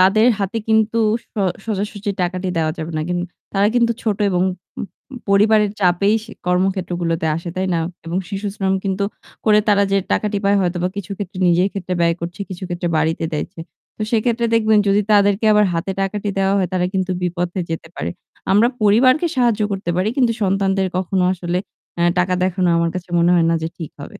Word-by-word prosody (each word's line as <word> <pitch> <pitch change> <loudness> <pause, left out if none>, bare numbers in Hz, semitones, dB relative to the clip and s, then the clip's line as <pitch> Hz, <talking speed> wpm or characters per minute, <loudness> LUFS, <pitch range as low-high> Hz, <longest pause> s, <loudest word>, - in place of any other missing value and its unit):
তাদের 210 +5 +5
হাতে 205 +3 -2
কিন্তু 220 +1 +2 0.3
স - - -39 0.4
সোজাসুজি 205 0 -3
টাকাটি 185 +1 -2
দেওয়া 155 -1 +1
যাবে 160 +1 -4
না। 155 - -1
কিন 175 0 -1 0.3
তারা 200 +1 +3
কিন্তু 235 -1 +3
ছোট 215 -3 0
উ - - +3
এবং 180 0 +1 0.9
পরিবারের 210 +1 +4
চাপেই 190 +3 +3
সে 225 - -13 0.2
কর্মক্ষেত্রগুলোতে 180 -3 0
আসে, 170 +1 -6
তাই 190 +1 0
না? - - +1 0.3
এবং 175 +3 -1
শিশুশ্রম 195 -1 -2
কিন্তু 195 +1 0 0.4
করে 210 -1 +5
তারা 200 -1 +4
যে - - +4 0.2
টাকাটি 210 -1 0
পায় 200 +1 +4
হয়তোবা 175 0 0
কিছু 200 0 -6
ক্ষেত্রে 190 -2 -6
নিজের 180 +3 +3
ক্ষেত্রে 185 -2 -3
ব্যয় 170 0 +3
করছে, 175 +3 -6
কিছু 185 0 -7
ক্ষেত্রে 175 0 -2
বাড়িতে 160 +1 0
দেয় 150 - -1
ছে 165 - -9 0.4
তো - - -3
সেক্ষেত্রে 235 +1 +1
দেখবেন 220 -1 +4
যদি 200 +1 +4
তাদেরকে 205 +1 +3
আবার 210 0 +5
হাতে 185 +4 -2
টাকাটি 200 +1 -2
দেওয়া 195 +1 +2
হয় 185 -3 0
তারা 180 -1 +1
কিন্তু 185 -1 0
বিপথে 175 +1 -2
যেতে 160 0 -4
পারে। - - -3 0.4
আমরা 220 +4 +5
পরিবারকে 255 - +4
সাহায্য 235 -4 +2
করতে 195 -3 -3
পারি 185 +4 +1
কিন্তু 245 -4 +3
সন্তানদের 195 0 +1
কখনো 185 0 0
আসলে 180 0 -2 0.4
অ্যা 170 - +1
টাকা 180 +1 +2
দেখানো 185 -1 +1
আমার 170 0 +1
কাছে 180 -1 -5
মনে 170 +1 +4
হয় 165 -1 +3
না 165 - +2
যে 160 - -1
ঠিক 165 -4 -6
হবে। 140 - -6
190 Hz, 190 wpm, -19 LUFS, 175-210 Hz, 0.9 s, তাদের